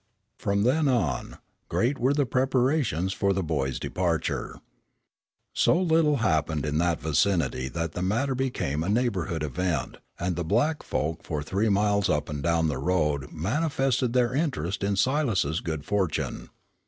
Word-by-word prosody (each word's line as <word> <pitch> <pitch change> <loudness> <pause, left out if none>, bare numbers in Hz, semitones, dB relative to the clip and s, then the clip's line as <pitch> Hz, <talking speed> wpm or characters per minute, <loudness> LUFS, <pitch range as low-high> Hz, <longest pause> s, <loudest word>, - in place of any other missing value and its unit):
From 100 0 +1
then 145 +6 +2
on, 90 - 0 0.3
great 130 +4 0
were 130 +4 +2
the 145 -1 +2
preparations 130 - +1
for 100 -1 +1
the 95 0 -1
boy's 70 -5 -1
departure. 85 -3 -2 0.9
So 170 - +3
little 160 -4 +3
happened 80 - 0
in 75 +1 0
that 85 -1 +1
vicinity 80 -4 +1
that 85 +2 -3
the 90 - -5
matter 115 +9 0
became 125 - -1
a 90 - -2
neighborhood 100 -8 0
event, 75 +1 -2 0.2
and 90 0 -1
the 85 - -2
black 120 - +1
folk 75 +5 -2
for 75 -2 -3
three 100 +8 0
miles 100 0 +2
up 75 0 0
and 75 -1 -4
down 85 0 +2
the 70 -4 -2
road 75 -4 0
manifested 130 - 0
their 125 -1 +2
interest 105 - -1
in 100 0 +1
Silas's 110 - +1
good 80 -4 -4
fortune. 100 -6 -1
95 Hz, 155 wpm, -26 LUFS, 80-125 Hz, 0.9 s, So